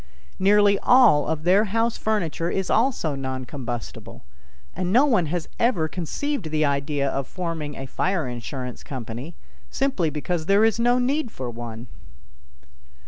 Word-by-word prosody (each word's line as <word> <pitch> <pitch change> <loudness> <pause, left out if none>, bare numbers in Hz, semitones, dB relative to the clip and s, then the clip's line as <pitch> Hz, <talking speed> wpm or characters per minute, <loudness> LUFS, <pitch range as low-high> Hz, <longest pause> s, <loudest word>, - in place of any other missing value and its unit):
Nearly 200 +1 +4
all 245 - +5
of 155 -1 -2
their 190 +5 +4
house 225 +3 0
furniture 175 -6 -1
is 190 0 -2
also 225 - +1
non 130 -1 -4
combustible, 120 -4 -7 0.5
and 180 0 -2
no 250 +7 +5
one 215 - +2
has 170 +1 -3
ever 210 -10 +2
conceived 185 - -3
the 155 0 +1
idea 140 0 0
of 135 0 -2
forming 165 -5 -4
a 135 - -6
fire 175 +2 -1
insurance 125 +1 -6
company, 125 +4 -7 0.3
simply 265 - 0
because 155 +2 -3
there 200 +2 +5
is 225 0 +1
no 240 +1 +3
need 265 +2 0
for 130 - -6
one. 115 0 -7
165 Hz, 145 wpm, -24 LUFS, 140-215 Hz, 0.5 s, all